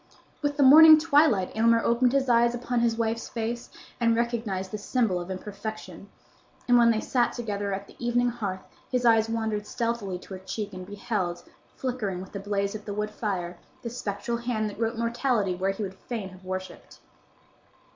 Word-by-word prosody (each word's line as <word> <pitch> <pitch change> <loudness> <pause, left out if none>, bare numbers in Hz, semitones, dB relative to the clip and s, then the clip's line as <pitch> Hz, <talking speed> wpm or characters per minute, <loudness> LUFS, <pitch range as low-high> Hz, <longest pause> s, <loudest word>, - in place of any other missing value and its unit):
With 290 0 -1
the 285 - +4
morning 310 +4 +10
twilight 295 - +3
Aylmer 230 +1 +4
opened 240 +2 +2
his 275 -1 +2
eyes 235 0 +4
upon 245 0 -1
his 230 -1 +1
wife's 230 0 -2
face 235 +1 -4 0.3
and 230 -1 +3
recognized 225 -5 -2
the 215 - -4
symbol 210 -4 0
of 175 - -8
imperfection; 200 0 -7 0.6
and 245 - +5
when 235 -1 +6
they 225 -2 +2
sat 240 +1 +1
together 205 -4 -3
at 195 +1 -4
the - - -17
evening 245 +1 +2
hearth 200 -6 -4 0.3
his 250 -1 0
eyes 225 -1 +4
wandered 220 -2 -2
stealthily 230 -6 -2
to 185 - -11
her 185 - -6
cheek, 200 +2 -5
and 185 0 -8
beheld, 195 -4 -3 0.3
flickering 235 -8 -3
with 185 - -9
the 200 - -5
blaze 200 0 -1
of 215 -1 -8
the 205 - -5
wood 210 0 -2
fire, 180 -5 -4 0.2
the 235 - -4
spectral 235 0 -3
hand 230 -3 -2
that 205 - -13
wrote 230 0 -1
mortality 235 -4 0
where 185 +2 -1
he 195 +2 -3
would 190 -1 -5
fain 210 0 -6
have 185 0 -15
worshipped. 185 0 -7
220 Hz, 185 wpm, -27 LUFS, 195-240 Hz, 0.6 s, morning